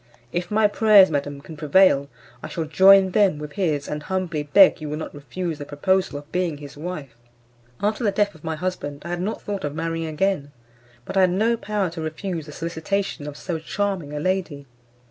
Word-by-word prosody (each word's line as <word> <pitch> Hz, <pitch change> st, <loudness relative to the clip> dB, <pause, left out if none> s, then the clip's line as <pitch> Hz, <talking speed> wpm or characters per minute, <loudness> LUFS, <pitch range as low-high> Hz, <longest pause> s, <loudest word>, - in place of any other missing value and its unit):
If 175 Hz, 0 st, -3 dB
my 215 Hz, +1 st, +3 dB
prayers, 205 Hz, -3 st, +6 dB
madam, 145 Hz, -1 st, -2 dB
can 160 Hz, -, -10 dB
prevail, 150 Hz, -2 st, +4 dB, 0.3 s
I -, -, -6 dB
shall 165 Hz, -, -3 dB
join 190 Hz, +4 st, +6 dB
them 195 Hz, -5 st, +3 dB
with 150 Hz, 0 st, -7 dB
his, 150 Hz, -4 st, -1 dB
and 150 Hz, 0 st, -4 dB
humbly 180 Hz, -2 st, -2 dB
beg 160 Hz, +5 st, +5 dB
you 150 Hz, -, -5 dB
will 150 Hz, -, -3 dB
not 155 Hz, -, -6 dB
refuse 155 Hz, +3 st, -5 dB
the 145 Hz, -, -6 dB
proposal 185 Hz, +4 st, 0 dB
of 145 Hz, +1 st, -11 dB
being 180 Hz, -4 st, -1 dB
his 145 Hz, -1 st, -10 dB
wife." 150 Hz, -6 st, -6 dB, 0.7 s
After 215 Hz, +3 st, 0 dB
the 210 Hz, -, +3 dB
death 205 Hz, +1 st, +1 dB
of 160 Hz, -, -18 dB
my 160 Hz, -1 st, -2 dB
husband 155 Hz, -4 st, -4 dB
I -, -, -5 dB
had 175 Hz, 0 st, -2 dB
not 210 Hz, +4 st, -3 dB
thought 200 Hz, -2 st, -4 dB
of 145 Hz, 0 st, -3 dB
marrying 165 Hz, 0 st, -2 dB
again. 155 Hz, -2 st, -1 dB, 0.5 s
But -, -, -4 dB
I -, -, +6 dB
had 185 Hz, -, +5 dB
no 220 Hz, +6 st, +2 dB
power 210 Hz, -5 st, -2 dB
to 165 Hz, -1 st, -6 dB
refuse 160 Hz, +1 st, -4 dB
the -, -, -8 dB
solicitation 165 Hz, +1 st, -3 dB
of 145 Hz, 0 st, -7 dB
so 170 Hz, -3 st, -4 dB
charming 190 Hz, -2 st, -2 dB
a 150 Hz, -, -4 dB
lady. 175 Hz, -4 st, -2 dB
165 Hz, 205 wpm, -23 LUFS, 150-190 Hz, 0.7 s, prayers